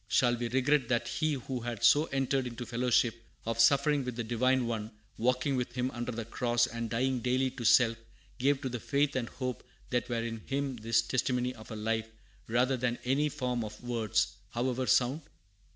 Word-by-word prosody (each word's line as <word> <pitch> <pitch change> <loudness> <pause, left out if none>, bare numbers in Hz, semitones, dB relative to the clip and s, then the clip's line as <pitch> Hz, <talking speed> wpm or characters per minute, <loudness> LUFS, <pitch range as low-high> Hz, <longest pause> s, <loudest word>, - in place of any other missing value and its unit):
Shall 120 +1 +3
we 120 0 -2
regret 130 +1 +2
that 120 -1 0
he 155 -1 0
who 130 -1 -4
had 120 -2 -5
so 150 +2 +6
entered 135 -2 0
into 120 0 -6
fellowship 120 -1 +1 0.2
of 115 0 -2
suffering 140 +4 +4
with 125 -2 -4
the 120 - -2
Divine 125 +3 +2
One, 110 -2 -3 0.3
walking 125 +4 +1
with 125 -1 -2
Him 125 +1 -1
under 120 0 -4
the 115 -1 -5
cross, 120 +1 +1
and 115 -2 -4
dying 130 +3 0
daily 130 +2 +1
to 120 - -7
self, 115 0 +5 0.4
gave 135 +2 +2
to 130 - -2
the 120 -1 -4
faith 140 +3 0
and 120 -3 -1
hope 125 -2 -4 0.3
that 125 0 0
were 115 -1 -1
in 115 -1 -4
him 135 -2 -2
this 115 +1 +2
testimony 125 +1 0
of 110 -2 -13
a 110 - -6
life, 110 +1 -1 0.4
rather 125 +3 +2
than 120 0 -1
any 140 +4 +2
form 125 -5 -2
of 110 +2 -9
words, 115 -2 0 0.2
however 125 +1 -1
sound? 130 +5 +3
125 Hz, 195 wpm, -31 LUFS, 115-130 Hz, 0.4 s, so